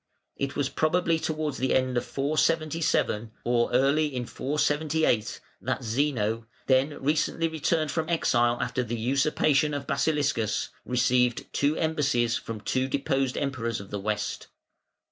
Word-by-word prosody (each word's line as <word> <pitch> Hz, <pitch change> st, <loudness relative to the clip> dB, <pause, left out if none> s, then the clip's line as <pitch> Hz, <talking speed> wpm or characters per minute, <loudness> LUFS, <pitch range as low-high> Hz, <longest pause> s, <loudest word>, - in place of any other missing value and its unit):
It 140 Hz, 0 st, -3 dB
was 145 Hz, -2 st, 0 dB
probably 165 Hz, +2 st, +1 dB
towards 155 Hz, -3 st, -2 dB
the 130 Hz, -, +1 dB
end 130 Hz, -1 st, +1 dB
of 120 Hz, -, +1 dB
477, 155 Hz, -5 st, 0 dB
or 120 Hz, -1 st, +1 dB
early 140 Hz, +5 st, +3 dB
in 125 Hz, -4 st, -4 dB
478, 145 Hz, -4 st, 0 dB, 0.2 s
that -, -, -2 dB
Zeno, 115 Hz, -3 st, 0 dB, 0.2 s
then 135 Hz, +3 st, +2 dB
recently 155 Hz, +3 st, +1 dB
returned 160 Hz, -1 st, 0 dB
from 160 Hz, +1 st, -2 dB
exile 120 Hz, -8 st, +2 dB
after 130 Hz, -, -1 dB
the 120 Hz, -1 st, -3 dB
usurpation 140 Hz, +4 st, +2 dB
of 140 Hz, -1 st, -4 dB
Basiliscus, 140 Hz, -7 st, 0 dB, 0.2 s
received 125 Hz, -1 st, +2 dB
two 145 Hz, +2 st, +1 dB
embassies 140 Hz, -7 st, +1 dB
from 110 Hz, -2 st, -5 dB
two 130 Hz, +4 st, 0 dB
deposed 135 Hz, -1 st, 0 dB
Emperors 115 Hz, -5 st, -2 dB
of 100 Hz, -1 st, -11 dB
the 105 Hz, -, -3 dB
West. 105 Hz, +1 st, -3 dB
135 Hz, 135 wpm, -27 LUFS, 120-155 Hz, 0.2 s, early